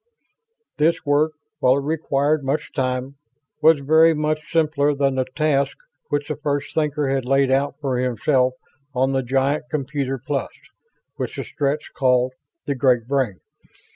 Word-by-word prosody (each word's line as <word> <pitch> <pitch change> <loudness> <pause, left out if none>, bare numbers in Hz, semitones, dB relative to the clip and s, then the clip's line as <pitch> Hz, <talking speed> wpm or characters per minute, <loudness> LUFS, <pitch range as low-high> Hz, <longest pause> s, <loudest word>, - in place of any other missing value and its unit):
This 165 +3 +2
work, 150 +2 +2 0.3
while 130 -1 +4
it 140 - -2
required 150 -1 0
much 135 +3 -2
time, 130 0 -2 0.4
was 155 -2 +5
very 160 +3 +5
much 155 0 -2
simpler 150 -3 +2
than 140 -1 +1
the 130 -1 0
task 150 -2 +1 0.3
which 145 0 -1
the 150 - -2
First 145 -1 -2
Thinker 150 -2 0
had 135 -1 0
laid 135 +1 +2
out 140 +2 +1
for 135 -4 -1
himself 125 +1 +1 0.4
on 130 +2 +2
the 135 0 +1
giant 135 +4 0
computer 140 -2 -2
plus 135 +3 -3 0.7
which - - -4
the - - -4
Stretts 145 0 -2
called 130 -1 +2 0.3
"The 145 - 0
Great 125 -3 +2
Brain." 125 - -1
140 Hz, 150 wpm, -22 LUFS, 130-150 Hz, 0.7 s, was